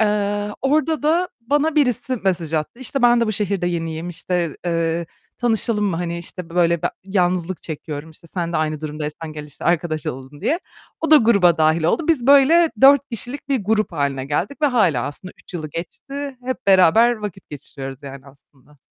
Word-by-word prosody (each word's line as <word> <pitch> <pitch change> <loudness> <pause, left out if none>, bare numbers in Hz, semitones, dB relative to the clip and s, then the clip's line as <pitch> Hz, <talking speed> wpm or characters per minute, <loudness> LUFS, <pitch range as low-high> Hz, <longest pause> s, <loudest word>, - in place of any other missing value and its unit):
Eee, 205 -1 0
orada 300 +2 +1
da 335 +4 +2
bana 290 +6 0
birisi 255 -2 +1
mesaj 175 -6 -1
attı: 155 +9 -2
"İşte 260 +1 -3
ben 240 0 +5
de 230 - +2
bu 215 - -1
şehirde 200 -3 -1
yeniyim, 165 -1 -3
işte, 175 -1 -2
eee, 165 0 0 0.3
tanışalım 225 -2 +1
mı? 180 -4 -1
Hani, 170 0 -3
işte, 170 0 -8
böyle, 170 -1 +2
be - - +1
yalnızlık 185 -2 0
çekiyorum, 155 0 -6
işte, 160 - -18
sen 170 0 -4
de - - 0
aynı 155 -1 -1
durumdaysan 155 +1 -5
gel, 150 -1 -7
işte, 145 - -12
arkadaş 165 -2 0
olalım." 135 +3 -7
diye. 335 +4 0 0.4
O 320 - -1
da 310 - +9
gruba 200 - +4
dâhil 155 +1 +3
oldu. 305 - +1
Biz 265 -7 +2
böyle 295 +5 +6
4 280 +1 +6
kişilik 245 +5 -5
bir 260 -8 0
grup 215 -2 +1
hâline 140 -3 -1
geldik 190 - -3
ve 295 - +6
hâlâ 190 - +2
aslında 165 +6 -8
3 - - -15
yılı 155 -3 -4
geçti. 275 - -6
Hep 260 -5 -4
beraber 195 +5 +6
vakit 205 -6 -8
geçiriyoruz 135 -1 -8
yani 135 0 -10
aslında. 140 0 -21
180 Hz, 185 wpm, -21 LUFS, 160-240 Hz, 0.4 s, da